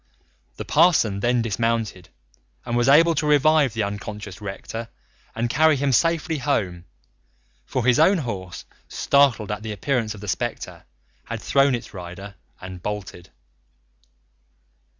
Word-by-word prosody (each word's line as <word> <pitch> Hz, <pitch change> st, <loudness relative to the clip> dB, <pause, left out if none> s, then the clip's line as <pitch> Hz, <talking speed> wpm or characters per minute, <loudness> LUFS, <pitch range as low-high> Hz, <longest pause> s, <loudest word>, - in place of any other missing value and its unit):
The -, -, -7 dB
parson 115 Hz, -, +3 dB
then 120 Hz, +2 st, +1 dB
dismounted 115 Hz, -4 st, -2 dB, 0.6 s
and 120 Hz, -1 st, -2 dB
was 120 Hz, +2 st, +2 dB
able 165 Hz, +4 st, +6 dB
to 150 Hz, -1 st, -1 dB
revive 150 Hz, -3 st, +3 dB
the 110 Hz, -, 0 dB
unconscious 105 Hz, 0 st, -6 dB
rector 110 Hz, +3 st, -6 dB, 0.5 s
and 115 Hz, +1 st, -1 dB
carry 155 Hz, +5 st, +3 dB
him 140 Hz, 0 st, 0 dB
safely 165 Hz, +2 st, +1 dB
home, 95 Hz, -12 st, -1 dB, 0.8 s
for 125 Hz, -3 st, -2 dB
his 125 Hz, +2 st, +4 dB
own 185 Hz, +5 st, +5 dB
horse, 95 Hz, -, -6 dB, 0.2 s
startled 135 Hz, -7 st, +2 dB
at 105 Hz, -, -4 dB
the 110 Hz, 0 st, -5 dB
appearance 110 Hz, 0 st, -2 dB
of 100 Hz, -, -12 dB
the 105 Hz, -, -8 dB
spectre, 90 Hz, -, -4 dB, 0.4 s
had -, -, -5 dB
thrown 135 Hz, -1 st, +2 dB
its 120 Hz, -, -8 dB
rider 95 Hz, +2 st, -9 dB, 0.3 s
and 95 Hz, -1 st, -9 dB
bolted. 95 Hz, -3 st, -6 dB
115 Hz, 135 wpm, -23 LUFS, 100-140 Hz, 0.8 s, able